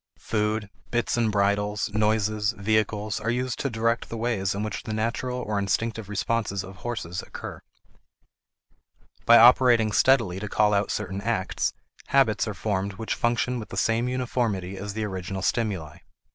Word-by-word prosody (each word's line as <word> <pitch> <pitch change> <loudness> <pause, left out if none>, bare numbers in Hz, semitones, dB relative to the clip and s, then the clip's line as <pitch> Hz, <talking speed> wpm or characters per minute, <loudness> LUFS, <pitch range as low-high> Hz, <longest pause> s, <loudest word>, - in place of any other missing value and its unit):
Food, 105 -1 -1 0.2
bits 120 -1 0
and 115 -2 +1
bridles, 105 +1 0
noises, 110 0 +1
vehicles, 110 0 0
are 110 - -2
used 125 +1 -1
to 140 - -1
direct 115 0 0
the 115 - -5
ways 110 -5 -1
in 100 - -2
which 105 -3 -4
the 110 - -5
natural 120 +3 -2
or 105 -4 -2
instinctive 105 +2 -1
responses 105 -1 -1
of 95 0 -11
horses 95 -5 -4
occur. - - -8 1.7
By 120 - +9
operating 120 -2 +6
steadily 110 -6 +3
to 105 0 -5
call 105 0 +3
out 100 0 +1
certain 100 -1 -3
acts, 105 -3 -1 0.3
habits 125 -5 +3
are 105 - -4
formed 100 -1 -2
which 110 +3 -3
function 120 +1 0
with 110 - -8
the - - -7
same 115 +2 +1
uniformity 120 -7 -1
as 100 +1 -5
the 110 - -2
original 95 -1 -4
stimuli. 95 -10 -1
110 Hz, 160 wpm, -26 LUFS, 100-115 Hz, 1.7 s, By